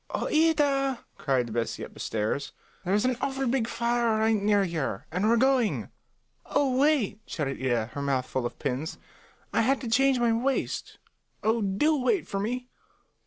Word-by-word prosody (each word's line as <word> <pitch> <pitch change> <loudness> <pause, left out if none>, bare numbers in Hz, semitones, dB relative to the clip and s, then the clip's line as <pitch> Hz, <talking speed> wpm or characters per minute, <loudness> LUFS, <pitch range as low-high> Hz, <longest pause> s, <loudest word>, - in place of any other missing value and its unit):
"Oh, - - -2
Ida," 285 -5 +2
cried 130 -6 0
Bessie 115 -1 -2
up - - -14
the - - -14
stairs, 110 +6 -2 0.3
"there's 205 +5 +1
an 255 -2 +1
awful 270 0 -1
big 240 -2 +1
fire 235 -1 +1
right 220 +1 +3
near 205 -1 +3
here, 160 - -3
and 185 +6 +1
we're 235 - +4
going." 260 -2 +2 0.6
"Oh, 275 -3 +1
wait!" 265 -7 +2
shouted 140 -4 -3
Ida, 120 -3 0
her 140 - -4
mouth 135 -2 0
full 130 -2 -2
of - - -12
pins. 140 +2 -3 0.6
"I - - +3
had 265 +4 +2
to 250 - -5
change 265 +3 +3
my 235 -1 +2
waist. 255 +4 -1 0.5
Oh, 225 +1 +2
do 215 +11 +2
wait 335 +9 +1
for 195 - -3
me. 245 +5 -3
225 Hz, 170 wpm, -27 LUFS, -, 0.6 s, we're